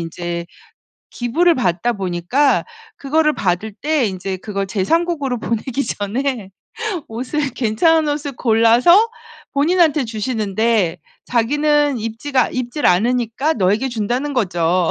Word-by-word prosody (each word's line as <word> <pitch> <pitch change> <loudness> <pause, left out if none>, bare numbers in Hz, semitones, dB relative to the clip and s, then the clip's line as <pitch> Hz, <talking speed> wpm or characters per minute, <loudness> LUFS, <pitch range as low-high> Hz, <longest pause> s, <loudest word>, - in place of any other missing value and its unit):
인제 170 +1 -5 0.6
기부를 325 +9 +2
받다 215 - 0
보니까 195 +9 +1 0.3
그거를 305 +2 +1
받을 190 +4 -1
때 295 +5 0
인제 190 0 -4
그걸 195 0 -4
제 190 0 -2
3 330 - +2
국으로 285 -8 -2
보내기 235 +5 -2
전에 225 0 -3 0.6
옷을 260 +6 -2
괜찮은 290 +7 +2
옷을 290 -1 -4
골라서 240 - +4 0.4
본인한테 310 0 +2
주시는데 220 -4 0 0.3
자기는 290 +4 +1
"입지가 230 +4 -1
입지를 255 +3 -1
않으니까 240 - +1
너에게 210 +6 +1
준다."는 245 +5 -2
거죠. 175 -5 +1
240 Hz, 275 characters per minute, -19 LUFS, 200-290 Hz, 0.6 s, 골라서